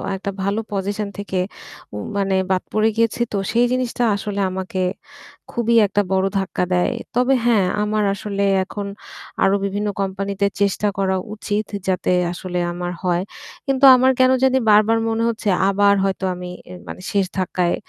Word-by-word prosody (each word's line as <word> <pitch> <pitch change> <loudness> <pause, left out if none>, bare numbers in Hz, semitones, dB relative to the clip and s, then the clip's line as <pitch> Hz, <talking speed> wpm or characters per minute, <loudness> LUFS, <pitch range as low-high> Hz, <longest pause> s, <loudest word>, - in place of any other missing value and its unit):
একটা 200 +1 -4
ভালো 200 +3 0
পজিশন 200 +1 -2
থেকে 195 -2 -3 0.5
উ - - -5 0.2
মানে 195 -1 +1 0.2
বাদ 185 - +1
পড়ে 215 +1 +3
গিয়েছি 230 +1 +1
তো 205 - -1
সেই 240 +1 +3
জিনিসটা 250 -1 -1
আসলে 200 0 -4
আমাকে 185 0 -4 0.7
খুবই 235 0 +1
একটা 205 +1 +1
বড় 190 0 +2
ধাক্কা 190 -1 -2
দেয়। 180 - +2 0.2
তবে 250 +2 +3
হ্যাঁ 215 -6 +4 0.2
আমার 210 0 0
আসলে 200 0 -3 0.2
এখন 200 +1 -6 0.6
আরো 195 +1 +4
বিভিন্ন 205 +2 -2
কোম্পানিতে 195 +1 -1 0.2
চেষ্টা 200 +1 +1
করা 190 -1 +1 0.2
উচিত, 210 0 -2 0.2
যাতে 185 -1 0 0.2
আসলে 180 0 -4
আমার 175 0 -4
হয়। 175 -1 +1 0.5
কিন্তু 270 0 +3
আমার 260 +1 +4
কেনো 255 0 +5
জানি 265 0 +4
বারবার 215 +2 +5
মনে 225 +1 0
হচ্ছে, 220 -2 -2 0.2
আবার 200 0 +4
হয়তো 195 0 -1
আমি 180 0 -7 0.2
এ - - -8
মানে - - -8
শেষ 200 -2 +2
ধাক্কায় 180 -1 0
200 Hz, 160 wpm, -20 LUFS, 190-220 Hz, 0.7 s, কেনো